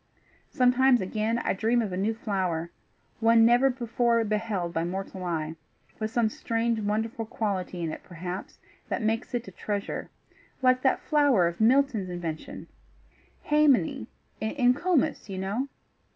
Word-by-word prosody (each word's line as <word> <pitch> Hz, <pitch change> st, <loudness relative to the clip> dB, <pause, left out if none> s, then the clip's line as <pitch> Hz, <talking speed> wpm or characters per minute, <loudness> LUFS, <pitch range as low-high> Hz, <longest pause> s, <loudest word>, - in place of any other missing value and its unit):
Sometimes, 250 Hz, 0 st, +4 dB
again, 215 Hz, +4 st, -1 dB
I -, -, 0 dB
dream 225 Hz, +5 st, +1 dB
of 210 Hz, -5 st, -1 dB
a -, -, -1 dB
new 205 Hz, +4 st, 0 dB
flower 185 Hz, -6 st, -2 dB, 0.5 s
one 225 Hz, 0 st, +5 dB
never 245 Hz, +3 st, +5 dB
before 235 Hz, -2 st, +1 dB
beheld 210 Hz, -5 st, -2 dB
by 165 Hz, -, 0 dB
mortal 190 Hz, +1 st, -5 dB
eye 160 Hz, -2 st, -2 dB, 0.4 s
with 215 Hz, 0 st, -1 dB
some 235 Hz, -1 st, +2 dB
strange, 230 Hz, +1 st, -1 dB
wonderful 220 Hz, +2 st, -1 dB
quality 190 Hz, -5 st, -3 dB
in 160 Hz, -, -2 dB
it, -, -, -7 dB
perhaps, 180 Hz, +1 st, -7 dB, 0.3 s
that -, -, -2 dB
makes 225 Hz, +3 st, -1 dB
it 240 Hz, -3 st, -3 dB
a -, -, -8 dB
treasure, 200 Hz, +2 st, -4 dB, 0.5 s
like 255 Hz, 0 st, +4 dB
that 265 Hz, -, +2 dB
flower 285 Hz, -, +3 dB
of 170 Hz, +4 st, -4 dB
Milton's 240 Hz, -4 st, +3 dB
invention 170 Hz, -3 st, -5 dB, 0.8 s
haemony 280 Hz, -, +3 dB, 0.3 s
in 245 Hz, +3 st, +2 dB
Comus, 315 Hz, -, 0 dB
you 190 Hz, -, -5 dB
know. 200 Hz, +8 st, -2 dB
220 Hz, 145 wpm, -27 LUFS, 185-245 Hz, 0.8 s, one